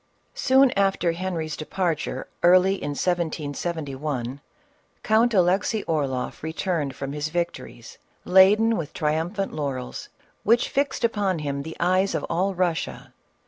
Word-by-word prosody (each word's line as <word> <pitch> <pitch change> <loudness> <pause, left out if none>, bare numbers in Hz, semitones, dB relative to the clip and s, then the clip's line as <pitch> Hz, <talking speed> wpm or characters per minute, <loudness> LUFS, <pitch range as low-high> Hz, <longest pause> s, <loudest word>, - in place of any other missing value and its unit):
Soon 270 - +4
after 195 -3 +1
Henry's 165 -3 -3
departure 165 -1 -2
early 185 +2 +5
in 145 -7 -4
1771, 150 -5 -3 0.6
Count 225 +2 +3
Alexey 195 +4 +2
Orloff 140 -6 -2
returned 160 -3 -2
from 135 +3 -5
his 150 +1 -3
victories, 170 +1 -5 0.3
laden 210 +5 +5
with 155 -2 -5
triumphant 165 +6 -1
laurels 135 -4 -4 0.3
which 230 +3 +3
fixed 280 +1 -1
upon 205 -5 +1
him 140 -2 -3
the 160 +3 -8
eyes 185 +3 +2
of - - -2
all 190 +2 0
Russia. 175 -2 -2
175 Hz, 120 wpm, -24 LUFS, 150-195 Hz, 0.6 s, early